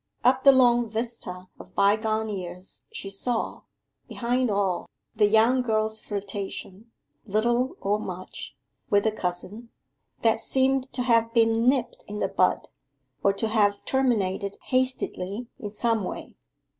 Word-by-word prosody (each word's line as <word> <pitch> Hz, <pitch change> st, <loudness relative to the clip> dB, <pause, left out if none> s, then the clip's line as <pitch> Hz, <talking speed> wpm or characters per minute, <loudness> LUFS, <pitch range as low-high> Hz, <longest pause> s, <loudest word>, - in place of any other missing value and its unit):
Up 255 Hz, +1 st, +4 dB
the 275 Hz, -, +9 dB
long 240 Hz, -3 st, +4 dB
vista 220 Hz, -5 st, -4 dB
of -, -, -13 dB
bygone 215 Hz, +2 st, +2 dB
years 180 Hz, -2 st, -7 dB
she 195 Hz, -, -7 dB
saw, 225 Hz, +4 st, -2 dB, 0.5 s
behind 245 Hz, +1 st, 0 dB
all, 200 Hz, -3 st, 0 dB, 0.3 s
the 210 Hz, -1 st, +4 dB
young 225 Hz, +4 st, +4 dB
girl's 220 Hz, -2 st, 0 dB
flirtation, 200 Hz, +1 st, -6 dB, 0.4 s
little 235 Hz, +5 st, +1 dB
or 205 Hz, +2 st, +1 dB
much, 185 Hz, -3 st, -7 dB, 0.3 s
with 205 Hz, 0 st, +4 dB
the 220 Hz, -, +2 dB
cousin, 200 Hz, +4 st, -5 dB, 0.5 s
that 225 Hz, -1 st, +3 dB
seemed 265 Hz, +2 st, +1 dB
to 250 Hz, -, -1 dB
have 230 Hz, -2 st, +3 dB
been 225 Hz, +1 st, +4 dB
nipped 260 Hz, -3 st, -1 dB
in 210 Hz, -, -6 dB
the -, -, 0 dB
bud, -, -, +1 dB, 0.6 s
or 200 Hz, -, +5 dB
to 210 Hz, +3 st, -2 dB
have 205 Hz, -2 st, +2 dB
terminated 205 Hz, -7 st, 0 dB
hastily 250 Hz, -5 st, -1 dB
in 210 Hz, -5 st, -5 dB
some 225 Hz, 0 st, 0 dB
way. -, -, -6 dB
220 Hz, 135 wpm, -26 LUFS, 200-240 Hz, 0.6 s, the